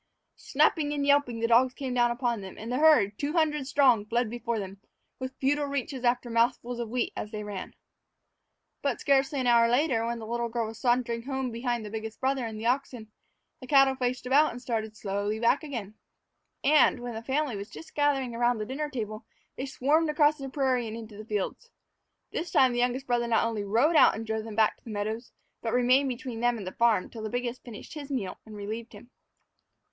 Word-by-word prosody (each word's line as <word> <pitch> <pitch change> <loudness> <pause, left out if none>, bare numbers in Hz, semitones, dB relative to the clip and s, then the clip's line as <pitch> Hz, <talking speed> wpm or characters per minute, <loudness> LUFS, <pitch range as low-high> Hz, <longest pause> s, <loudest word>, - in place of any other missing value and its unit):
Snapping 295 -3 +2
and 285 -1 -1
yelping, 280 -5 +3
the - - +2
dogs 250 +2 +4
came 265 -3 -4
down 240 -1 +3
upon 240 -2 -1
them, 190 -1 -9
and 225 +3 -6
the 250 - 0
herd, 295 -11 +5
two 290 +1 -2
hundred 300 -5 +1
strong, 260 -7 +4
fled 230 +1 -1
before 235 -1 -2
them, 195 -1 -6 0.4
with 260 0 -6
futile 290 +2 +1
reaches 275 -2 -3
after 245 0 +1
mouthfuls 240 +1 0
of 235 - -3
the - - -12
wheat 245 -1 -1
as 210 - -5
they 210 -1 -5
ran. 205 -2 -7 1.1
But, 280 -5 -1
scarcely 275 +1 +2
an 255 - -1
hour 235 -1 +5
later, 245 -1 +2
when 235 +1 -2
the 225 - -7
little 235 +1 -2
girl 230 0 -1
was 220 +1 -8
sauntering 240 -2 +1
home 265 -2 -2
behind 235 -1 -2
the 210 - -7
biggest 220 0 -6
brother 265 -2 0
and 220 -1 -7
the 225 - -6
oxen, 245 -3 -1 0.5
the 255 - -10
cattle 270 -1 +5
faced 255 -1 -2
about 285 +4 +4
and 240 - -7
started 220 -3 -3
slowly 205 +2 -2
back 235 +4 +3
again; 235 -9 -6 0.7
and, 295 -2 +5
when 240 0 -5
the 225 - -5
family 270 +1 -1
was 200 +1 -6
just 325 - -11
gathering 275 -4 +1
about 240 0 +2
the 215 - -3
dinner 295 +5 -3
table, 215 -4 -5 0.3
they 265 - -4
swarmed 300 +5 +2
across 300 0 +3
the 270 -1 -5
prairie 260 -3 0
and 220 +1 -6
into 220 -2 -9
the 215 +1 -9
fields. 215 - -3 0.6
This 340 - -3
time 260 -4 +4
the 240 - -1
youngest 250 +2 0
brother 240 -1 0
not 230 -1 +2
only 225 -3 -2
rode 235 +11 +2
out - - +6
and 225 - -5
drove 220 0 -3
them 220 -2 -7
back 220 0 +3
to - - -33
the - - -10
meadows, 215 +3 -4 0.3
but 225 -1 -2
remained 255 +3 +4
between 245 -2 -5
them 240 0 +1
and 200 - -7
the 185 - -4
farm 230 -5 +2
till 225 - -8
the 215 - -4
biggest 245 +1 -3
finished 235 -4 -10
his 295 -3 -7
meal 215 -10 -3
and 215 - -10
relieved 220 +3 -6
him. 240 - -14
240 Hz, 220 wpm, -28 LUFS, 225-270 Hz, 1.1 s, out